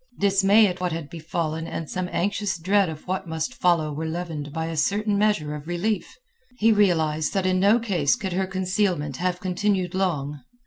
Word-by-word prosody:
Dismay 200 +2 +5
at 180 -2 -1
what 180 -1 0
had 160 -3 -5
befallen 160 0 -3
and 165 - -5
some 180 +2 -3
anxious 200 0 -1
dread 190 +2 +2
of 155 +1 -9
what 185 0 -2
must 160 +8 -3
follow 170 -7 +1
were 160 +2 -3
leavened 160 -3 -4
by 160 +1 -3
a 165 0 -4
certain 205 +7 +1
measure 200 -8 +1
of 150 0 -8
relief. 175 +2 -2 0.4
He 225 0 +4
realized 160 -6 +2
that 190 -1 +1
in 185 0 +2
no 200 +4 +5
case 180 - +1
could 190 -3 -4
her 190 +1 0
concealment 185 -6 -1
have 180 0 -1
continued 185 0 0
long. 150 -7 -1
180 Hz, 185 wpm, -24 LUFS, 160-195 Hz, 0.4 s, Dismay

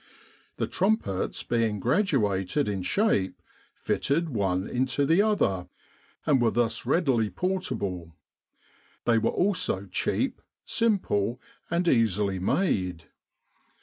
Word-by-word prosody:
The - - 0
trumpets, 190 - -1
being 115 -3 0
graduated 125 - +1
in 100 -2 -2
shape, 100 - +1 0.4
fitted 160 +4 0
one 95 -6 -1
into 130 +3 0
the 165 +7 +4
other, 100 - +1 0.6
arid 135 -4 +3
were 115 - +4
thus 120 0 -1
readily 130 - +2
portable. 100 - -3 0.9
They 115 -1 +4
were 115 - +1
also 180 - 0
cheap, 95 - -1 0.2
simple, 125 - +1 0.3
and 175 +1 0
easily 105 - +2
made. 90 - -1
115 Hz, 105 wpm, -27 LUFS, -, 0.9 s, the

